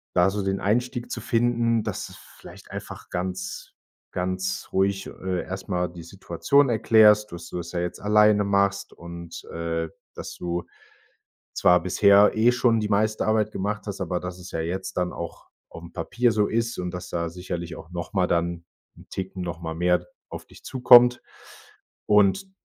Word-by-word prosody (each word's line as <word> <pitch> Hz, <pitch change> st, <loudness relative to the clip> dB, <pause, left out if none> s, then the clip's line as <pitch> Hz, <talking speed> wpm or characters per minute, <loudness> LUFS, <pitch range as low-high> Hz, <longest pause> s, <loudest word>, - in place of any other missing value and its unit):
da 90 Hz, +2 st, +5 dB
so 100 Hz, 0 st, -3 dB
den 95 Hz, 0 st, -1 dB
Einstieg 120 Hz, +4 st, -1 dB
zu -, -, -4 dB
finden, 115 Hz, -1 st, +1 dB
dass -, -, -4 dB
es -, -, -13 dB
vielleicht -, -, -15 dB
einfach -, -, -8 dB
ganz 90 Hz, +1 st, -4 dB, 0.4 s
ganz 95 Hz, +1 st, -3 dB
ruhig, 95 Hz, 0 st, 0 dB
äh, 95 Hz, -1 st, -3 dB
erstmal 90 Hz, -2 st, -3 dB
die 85 Hz, -1 st, -10 dB
Situation 95 Hz, -, +1 dB
erklärst, 105 Hz, -2 st, +5 dB
dass 85 Hz, -1 st, -8 dB
du -, -, -5 dB
das 85 Hz, -1 st, -6 dB
ja 90 Hz, -, -2 dB
jetzt 90 Hz, 0 st, -3 dB
alleine 105 Hz, 0 st, +4 dB
machst 100 Hz, 0 st, +1 dB
und, 85 Hz, 0 st, -9 dB
äh, 80 Hz, 0 st, -3 dB, 0.3 s
dass -, -, -8 dB
du 85 Hz, 0 st, -3 dB, 0.9 s
zwar 90 Hz, 0 st, +4 dB
bisher 100 Hz, +3 st, +5 dB
eh 115 Hz, +2 st, +5 dB
schon 120 Hz, -2 st, +2 dB
die 105 Hz, -, -2 dB
meiste 110 Hz, +1 st, +1 dB
Arbeit 110 Hz, -1 st, +1 dB
gemacht 105 Hz, +3 st, -3 dB
hast, 100 Hz, -1 st, -5 dB
aber 90 Hz, -1 st, -1 dB
dass 90 Hz, 0 st, -7 dB
es 90 Hz, -, -10 dB
ja -, -, -4 dB
jetzt 90 Hz, +4 st, -3 dB
dann 90 Hz, 0 st, 0 dB
auch 85 Hz, -1 st, -8 dB, 0.2 s
aufm 85 Hz, 0 st, -11 dB
Papier 120 Hz, +8 st, 0 dB
so 105 Hz, -1 st, +2 dB
ist 115 Hz, +1 st, -1 dB
und 90 Hz, -1 st, -3 dB
dass 90 Hz, 0 st, -6 dB
da 85 Hz, -1 st, -2 dB
sicherlich 85 Hz, -1 st, -6 dB
auch 85 Hz, -, -12 dB
noch 85 Hz, -2 st, -5 dB
mal 90 Hz, -2 st, +3 dB
dann 85 Hz, 0 st, -1 dB, 0.3 s
'n -, -, -16 dB
Ticken 95 Hz, -1 st, -5 dB
noch 85 Hz, -1 st, -5 dB
mal 80 Hz, -1 st, -5 dB
mehr 90 Hz, 0 st, +2 dB, 0.2 s
auf -, -, -8 dB
dich -, -, -18 dB
zukommt. 125 Hz, -1 st, +6 dB, 0.8 s
Und 105 Hz, -, +3 dB
95 Hz, 175 wpm, -25 LUFS, 90-105 Hz, 0.9 s, zukommt